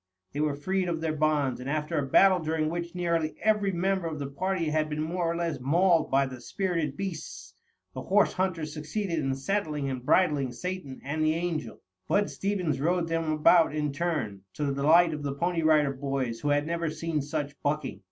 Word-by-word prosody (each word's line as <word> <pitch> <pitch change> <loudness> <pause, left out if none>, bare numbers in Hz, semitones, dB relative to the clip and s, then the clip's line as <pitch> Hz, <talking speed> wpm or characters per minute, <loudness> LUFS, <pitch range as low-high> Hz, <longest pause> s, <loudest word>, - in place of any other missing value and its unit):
They 145 - -4
were 150 -1 +1
freed 185 +5 -1
of 165 -2 -1
their 160 -1 -1
bonds, 150 -4 +1
and 130 +2 -5
after 155 +2 -1
a 140 - -2
battle 190 +5 +6
during 155 -1 -1
which 170 +1 -4
nearly 170 -3 0
every 210 -2 +2
member 190 0 0
of 155 -2 -4
the 145 - -4
party 180 +1 -1
had 155 0 +1
been 150 0 -2
more 170 +1 -1
or - - -3
less 170 -4 -2
mauled 165 +5 +3
by 135 +1 +3
the 130 -2 -8
spirited 165 0 -2
beasts, 150 - -6 0.4
the 130 - -5
horse 205 +9 +3
hunters 170 -5 -2
succeeded 165 +3 -3
in 135 -2 -1
saddling 150 -2 -2
and 130 -2 -5
bridling 145 -4 +2
Satan 180 -3 -5
and 155 +3 -2
the 155 0 +2
Angel. 165 -8 -3 0.3
Bud 205 0 +1
Stevens 185 -8 -1
rode 170 +2 +1
them 165 -1 0
about 155 0 +4
in 150 -2 -1
turn, 145 - -2
to 150 - -2
the 140 - 0
delight 160 +5 +4
of 150 - -5
the 140 -1 -3
Pony 170 +2 0
Rider 155 -3 +3
Boys 135 -4 -3
who 145 - -1
had 145 0 +2
never 170 0 -1
seen 155 0 -2
such 145 0 -3
bucking. 145 -8 -2
155 Hz, 200 wpm, -28 LUFS, 145-175 Hz, 0.4 s, battle